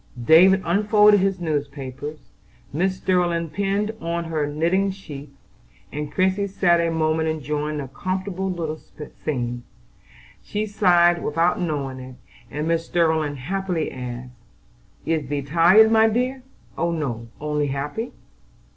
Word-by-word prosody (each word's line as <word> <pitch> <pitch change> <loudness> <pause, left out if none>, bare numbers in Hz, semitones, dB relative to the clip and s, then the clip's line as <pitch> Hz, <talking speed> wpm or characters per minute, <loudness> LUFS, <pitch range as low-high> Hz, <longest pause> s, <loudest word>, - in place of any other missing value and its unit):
David 185 - +6
unfolded 210 +3 +5
his 195 -1 0
newspapers, 145 -2 -5 0.4
Mrs. 185 +4 -1
Sterling 175 -3 +1
pinned 200 +2 0
on 170 +1 -2
her 160 -3 -2
knitting 170 +7 +1
sheath, 150 -7 -8 0.6
and 150 0 -5
Christie 190 +4 +1
sat 175 -3 +2
a 170 0 +1
moment 160 0 +1
enjoying 150 0 -2
the 140 -2 -4
comfortable 185 +6 -3
little 160 -3 -3
scene. 120 -5 -5 0.8
She 210 +1 -3
sighed 175 -4 +3
without 165 +4 +1
knowing 140 -6 -2
it, 130 0 -10 0.3
and 150 +2 -3
Mrs. 165 0 0
Sterling 160 -4 +1
asked 195 +1 -2
quickly: 170 -4 -1 1.1
"Is 155 -4 -1
thee 145 -1 -2
tired, 175 +9 +6
my 225 0 +5
dear?" 250 +4 -1 0.4
"Oh, 170 - +1
no! 130 -9 -3
only 150 -1 -1
happy." 145 - -3
165 Hz, 130 wpm, -23 LUFS, 150-190 Hz, 1.1 s, David